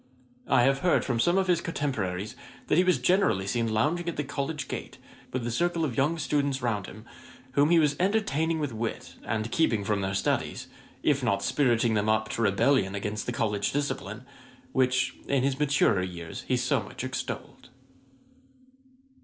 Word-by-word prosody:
'I 120 - +4
have 135 +2 +3
heard 180 +4 +2
from 120 -3 -1
some 175 +9 +3
of 190 - +3
his 175 -2 +2
cotemporaries 110 - -2 0.3
that - - +2
he - - +5
was 180 -1 +3
generally 175 - +2
seen 115 +2 0
lounging 155 +11 +1
at 170 - -5
the 150 - 0
College 140 0 -3
gate, - - -6 0.3
with 125 -2 -3
a 120 - -2
circle 170 +5 +1
of 130 -6 -3
young 150 +5 +1
students 140 -3 0
round 110 -6 -1
him, 110 +2 -11 0.5
whom 145 +3 +3
he 170 - +5
was 150 -3 +3
entertaining 165 -5 +1
with 145 -5 -2
wit, 115 +1 -4
and 110 +1 -2
keeping 120 -8 +2
from 100 0 0
their 95 0 -2
studies, - - -1 0.4
if 140 -3 +2
not 100 -5 +1
spiriting 120 -5 +2
them 105 0 +1
up 110 0 +1
to 115 - -3
rebellion 110 0 +2
against 105 +1 -3
the - - 0
College 105 -3 0
discipline, 145 0 -3 0.5
which 130 0 +1
in 135 -2 +1
his 135 0 0
maturer 140 -9 +3
years 85 -3 -6
he 130 - +2
so 125 +1 +1
much 105 - -8
extolled.' 130 0 -5
130 Hz, 180 wpm, -28 LUFS, 110-150 Hz, 0.5 s, he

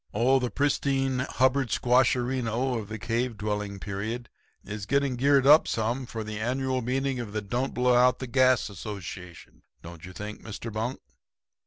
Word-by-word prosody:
Oh, 130 +5 +4
the 125 -1 -1
pristine 135 -2 0
Hubbard 130 0 +1
squasherino 125 0 +1
of 105 - -10
the 110 - -5
cave 115 +2 -2
dwelling 105 -1 -3
period 110 +5 -4 0.4
is 105 -1 -6
getting 140 0 +1
geared 135 +2 +3
up 150 +3 +7
some 120 +3 -1
for 115 -1 -5
the 105 0 -6
annual 130 +3 -1
meeting 130 +2 -1
of 110 -4 -6
the 105 - -1
Don't 120 +7 -2
Blow 125 0 +3
Out 125 +1 +5
the 130 - -5
Gas 130 -1 +3
Association, 95 -4 -9 0.2
don't 85 -1 -11
you 90 - -8
think, 105 +4 -7
Mr. 110 +1 -7
Bunk?' 115 +4 -3
120 Hz, 165 wpm, -27 LUFS, 105-130 Hz, 0.4 s, up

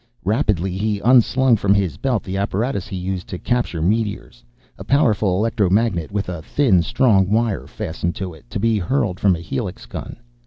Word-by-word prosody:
Rapidly 100 - 0
he 105 -1 0
unslung 125 0 +4
from 100 -1 +2
his 95 -8 0
belt 125 -5 -1
the 95 - -5
apparatus 100 +2 -1
he 105 - -6
used 90 0 -4
to 90 - -5
capture 120 -8 -1
meteors. 105 - -2 0.4
A - - -6
powerful 110 -9 +2
electromagnet, 105 -4 +1
with 100 -1 -2
a 90 -3 -5
thin, 105 - +2
strong 95 0 +2
wire 110 -1 0
fastened 85 -4 -4
to 95 -3 -5
it, 75 -6 -17
to - - -4
be 115 0 +2
hurled 100 -2 -1
from 95 -3 +3
a - - -7
helix 75 -5 -5
gun. - - -7
100 Hz, 180 wpm, -20 LUFS, 90-115 Hz, 0.4 s, unslung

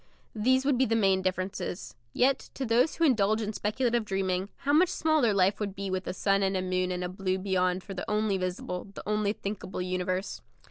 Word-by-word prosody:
These 260 +5 +2
would 275 -3 +2
be 265 - +4
the 225 - +1
main 195 -4 +3
differences. 185 0 -3 0.2
Yet, 265 - +1
to 270 - -3
those 240 +6 +2
who 335 - -1
indulge 215 -7 +3
in 215 -1 -3
speculative 235 +3 0
dreaming, 190 -1 -1 0.2
how 285 - +3
much 335 +4 +5
smaller 310 -8 +2
life 195 0 +2
would 200 -2 -3
be 195 -1 -4
with 185 0 -3
a - - -1
sun 195 0 +2
and 190 0 +1
a - - 0
moon 185 0 0
and 180 0 -2
a - - -1
blue 185 +1 -2
beyond 185 -1 0
for 195 - -7
the 185 - -5
only 210 -2 +1
visible, 180 0 -3
the - - -9
only 210 -1 +1
thinkable 200 -3 -5
universe. 185 +1 -2
200 Hz, 215 wpm, -28 LUFS, 185-225 Hz, 0.2 s, much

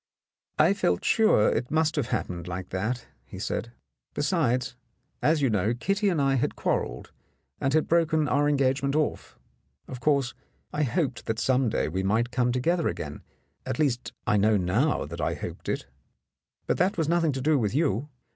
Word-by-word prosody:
"I - - +5
felt 90 - 0
sure 215 - +4
it 120 +2 -1
must 160 0 +1
have 145 -6 0
happened 90 -7 -3
like 90 0 -5
that," 110 +6 -2 0.2
he - - -11
said. 115 - -3 0.4
"Besides, 125 +1 0 0.5
as 155 -1 +2
you 135 - +4
know, 105 +3 +1
Kitty 195 - 0
and 170 -5 0
I 135 -1 +2
had - - -1
quar - - +1
relled - - -9 0.5
and 135 - 0
had 155 +1 +2
broken 160 -2 +2
our 145 +1 +2
engagement 140 0 +1
off. 155 -1 -2 0.5
Of 130 - -7
course, 140 -3 +1 0.4
I 150 - -1
hoped 140 -2 -1
that 110 - -1
some 130 0 +2
day - - 0
we 90 +5 -2
might 110 +5 +1
come 125 -1 +1
together 165 +8 +1
again - - -5 0.2
— - - -45
at 130 -1 -2
least, 130 -5 0
I 105 - +3
know 105 +1 +4
now 100 - +1
that 85 +3 -6
I - - 0
hoped - - -7
it. - - -2 0.8
But - - 0
that 185 +2 +2
was 160 -3 0
nothing 165 -1 +2
to 135 - -3
do 150 +1 +3
with 110 0 -1
you. 145 - +1
130 Hz, 185 wpm, -27 LUFS, 110-155 Hz, 0.8 s, I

